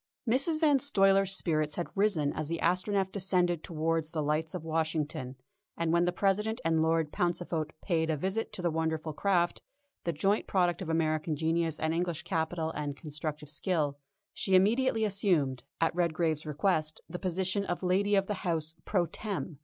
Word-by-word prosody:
Mrs. 275 +7 +2
Van 295 -4 +4
Stuyler's 195 -7 +3
spirits 155 -5 +1
had 175 - -2
risen 195 -8 +2
as 155 - -3
the 165 +2 -2
Astronef 190 +3 +1
descended 180 -4 +1
towards 165 -1 -1
the 160 -2 -2
lights 155 +3 -1
of 175 - -5
Washington, 155 -5 -2 0.4
and 165 -1 0
when 170 0 +4
the 180 - +2
President 210 +5 +1
and 165 -1 +3
Lord 160 -1 +1
Pauncefote 175 -3 -1
paid 165 -3 +1
a 155 - +1
visit 190 +8 -2
to 180 - -5
the 170 - +2
wonderful 160 -1 -1
craft, 175 0 +1 0.4
the 170 - 0
joint 195 +7 +1
product 180 -1 +1
of 175 - -4
American 155 -1 0
genius 160 +1 0
and 160 0 0
English 170 -1 -1
capital 160 -2 -1
and 145 -2 -4
constructive 150 -1 -5
skill, 155 -4 -1 0.3
she 190 - +1
immediately 225 +4 +3
assumed, 175 - +1 0.2
at 165 - +2
Redgrave's 165 -2 0
request, 155 0 0
the 180 - -6
position 190 +2 0
of 175 0 -3
lady 200 +3 +2
of 195 -1 +3
the 210 - -2
house 160 -4 -1
_pro 180 -4 +2
tem. 190 -8 -4
170 Hz, 170 wpm, -30 LUFS, 155-190 Hz, 0.4 s, Van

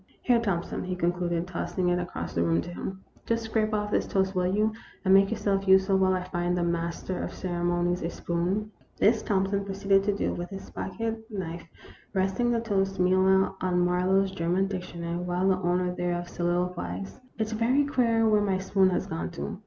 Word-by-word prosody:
" - - -36
Here, 245 -2 +4
Thompson," 195 -7 -2
he 185 0 -3
concluded, 175 -1 0
tossing 180 0 -2
it 175 0 +2
across 175 - -5
the 85 - 0
room 85 0 +2
to - - -7
him, 190 +2 -6
" - - -30
just 230 0 0
scrape 220 -1 0
off 210 -1 -1
this - - +1
toast, 190 0 +1
will 180 -1 +1
you, 210 +3 +1 0.3
and 190 - +5
make 195 0 +6
yourself 200 -3 -1
useful 190 +1 +5
while 185 0 +3
I 180 - -2
find 180 -1 -1
the 175 - +1
master 170 +1 -2
of - - -4
ceremonies 175 0 -1
a 165 - -2
spoon? 180 +6 -2
" - - -36
This 220 +1 +4
Thompson 195 0 0
proceeded 195 0 +2
to 205 -1 +1
do - - 0
with 175 0 -5
his 195 -1 -9
pocket 225 +2 -4
knife, 170 -5 -5 0.5
resting 190 +5 +1
the 235 -1 +1
toast, 195 -3 0
meanwhile, 190 +1 +3
on 180 -1 +2
Marlowe's 190 +2 +2
German 180 +1 0
dictionary, 175 -3 -4
while 180 +1 -1
the 190 -1 +3
owner 180 0 +1
thereof 175 -1 -2
solilo 175 +1 -1
quized: 95 - -6
" - - -34
It 220 -1 -1
's - - -7
very 240 +6 +2
queer 230 -5 +2
where 210 -1 +4
my 195 -2 +1
spoon 190 0 +2
has 180 - -1
gone 160 +1 -4
to. 170 - -5
190 Hz, 205 wpm, -27 LUFS, 175-200 Hz, 0.5 s, make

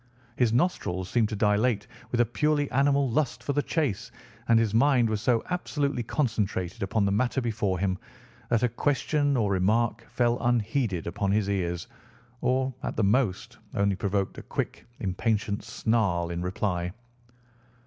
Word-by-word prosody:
His 120 -3 +2
nostrils 115 - 0
seemed 115 -3 +2
to 110 - -3
dilate 105 +2 +2 0.2
with 120 - -1
a - - +4
purely 145 +5 0
animal 140 +1 +3
lust 120 -4 0
for 140 - -1
the 145 - +2
chase, 145 - -1 0.4
and 115 - +5
his 115 -2 +2
mind 125 0 +4
was 105 -1 -1
so 115 -2 +2
absolutely 145 -7 -1
concentrated 110 - -1
upon 100 +2 +1
the 100 - +1
matter 120 +6 +1
before 110 -6 -1
him 95 0 -1 0.5
that 115 -1 +2
a - - +5
question 145 +3 +1
or 105 -4 +1
remark 110 +4 +1
fell 120 0 +1
unheeded 115 - 0
upon 95 +3 -1
his 105 -1 +1
ears, 90 -3 -2 0.5
or, 130 +1 +1
at - - -3
the 110 - +1
most, 105 -1 +1 0.2
only 100 -1 +2
provoked 100 0 -1
a - - -7
quick, - - -4
impatient 105 +1 -1
snarl 95 -7 0
in 85 0 -3
reply. 90 -1 -1
110 Hz, 160 wpm, -27 LUFS, 100-125 Hz, 0.5 s, and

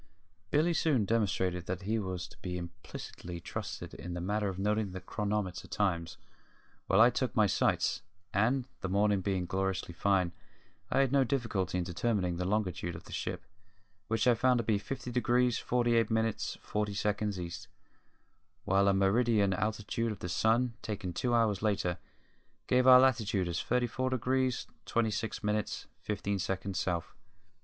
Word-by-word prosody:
Billy 155 - +3
soon 145 -10 +2
demonstrated 95 -5 0
that 90 +1 -3
he 110 +3 0
was 95 -3 -4
to - - -16
be 90 -1 -4
implicitly 85 0 -8
trusted - - -6
in 90 0 -6
the - - -3
matter 100 +3 0
of 95 - -5
noting 105 0 0
the 95 - -4
chronometer 100 -2 -3
times 85 -5 -1 0.7
while - - +4
I 120 +2 +8
took 125 +1 -2
my 110 -3 +5
sights, 100 - +1 0.3
and, 120 +5 +2
the 95 - -3
morning 100 0 +2
being 95 -2 -1
gloriously 95 -1 -2
fine, 95 -1 +2 0.6
I - - +3
had 135 -2 +2
no 140 -1 +5
difficulty 115 -9 -1
in 90 - 0
determining 90 0 -1
the 90 - -2
longitude 90 -4 -1
of 80 - -9
the - - -13
ship, - - -4 0.6
which 110 -1 +1
I 125 - +6
found 125 +2 +3
to 115 - 0
be 105 -2 +1
50 125 +3 -5
degrees 125 0 +2
48 120 -2 +2
minutes 110 -1 0
40 105 -1 -2
seconds 105 -1 -1
East, 85 -1 -6 1.0
while 100 +1 +3
a 100 - +4
meridian 100 0 +3
altitude 110 +3 -1
of 105 - -5
the 90 - -5
sun, 115 +6 +2
taken 95 -4 -4
two 120 +6 0
hours 110 -4 +2
later, 95 -5 0 0.7
gave 125 0 +3
our 130 -1 +10
latitude 110 -8 +2
as 85 0 -1
34 125 +1 0
degrees 130 0 0 0.2
26 110 -1 -1
minutes 105 0 -1
15 100 -1 -2
seconds 95 0 -2
South. 85 -2 -2
105 Hz, 160 wpm, -31 LUFS, 95-115 Hz, 1.0 s, our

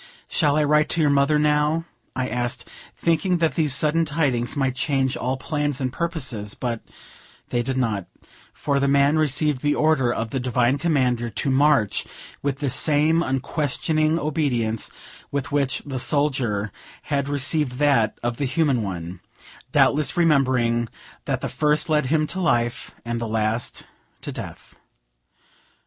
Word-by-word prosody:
"Shall 145 -4 +2
I 155 - +3
write 150 +1 +3
to 165 - +2
your 150 -2 +3
mother, 140 +2 +3
now?" 150 +2 +1 0.3
I 130 -1 -1
asked, 120 -1 -3 0.3
thinking 170 +2 +1
that 165 -2 +1
these 150 -5 +1
sudden 155 +3 +2
tidings 140 -6 -1
might 135 -3 0
change 135 -1 0
all 130 +2 -2
plans 145 0 -2
and 130 -2 -2
purposes; 135 - -3
but 120 -3 -3 0.7
they 120 - 0
did 130 +2 -2
not; 110 -7 -1 0.4
for 140 -1 -1
the 140 - +1
man 140 +2 +3
received 150 -2 +1
the 145 0 +1
order 150 -6 +2
of 115 -2 -3
the 135 - -1
Divine 125 +1 +1
Commander 125 -7 +1
to 135 +5 -1
march 135 -6 +2 0.3
with 140 -1 -1
the 140 -1 -2
same 155 +4 +3
unquestioning 155 +3 0
obedience 135 -8 -1 0.4
with 140 -1 -3
which 140 -3 0
the 135 -3 -4
soldier 125 -8 0 0.3
had 140 -2 -1
received 145 -1 +1
that 130 -5 +2
of 120 0 -2
the 140 - -1
human 135 -2 +1
one, 90 -3 -5 0.5
doubtless 150 +3 +3
remembering 130 -8 +2 0.4
that - - -2
the - - -2
first 150 +1 +1
led 150 -4 +2
him 155 +2 +2
to 185 +5 -5
life, 120 -5 0
and 120 0 -3
the 115 - -2
last 110 +1 -2 0.4
to - - -5
death. - - -8
140 Hz, 155 wpm, -23 LUFS, 125-150 Hz, 0.7 s, I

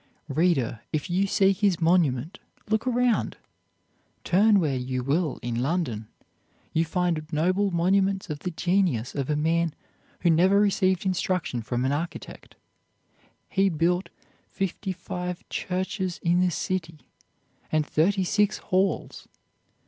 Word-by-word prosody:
Reader, 140 -7 +1
if 155 +2 -2
you 190 +3 +2
seek 195 -1 +3
his 200 -5 +2
monument, 165 -1 +1 0.3
look 220 +3 0
around!" 245 -1 +1 0.9
Turn 205 +3 +4
where 150 -6 0
you 130 0 -3
will 150 +3 0
in 120 0 -2
London, 130 -8 -1 0.7
you 165 +1 +2
find 170 -2 0
noble 185 +6 +1
monuments 190 +2 +1
of 150 -4 -5
the 180 - -3
genius 175 - 0
of 140 -1 -3
a 150 - +2
man 165 +1 +1 0.5
who 170 - +4
never 185 +5 +4
received 190 -2 +2
instruction 180 -7 -1
from 120 +3 -2
an 135 - +1
architect. 160 +4 -5 0.9
He 195 0 +2
built 175 +3 0 0.4
fifty 195 +1 -3
five 180 0 -5
churches 185 0 -3
in 175 +1 +3
the 180 0 +3
city 165 -2 -3 0.7
and 155 -1 +2
thirty 190 +7 +2
six 205 +3 +1
halls. 190 +1 -1
175 Hz, 130 wpm, -26 LUFS, 155-190 Hz, 0.9 s, Turn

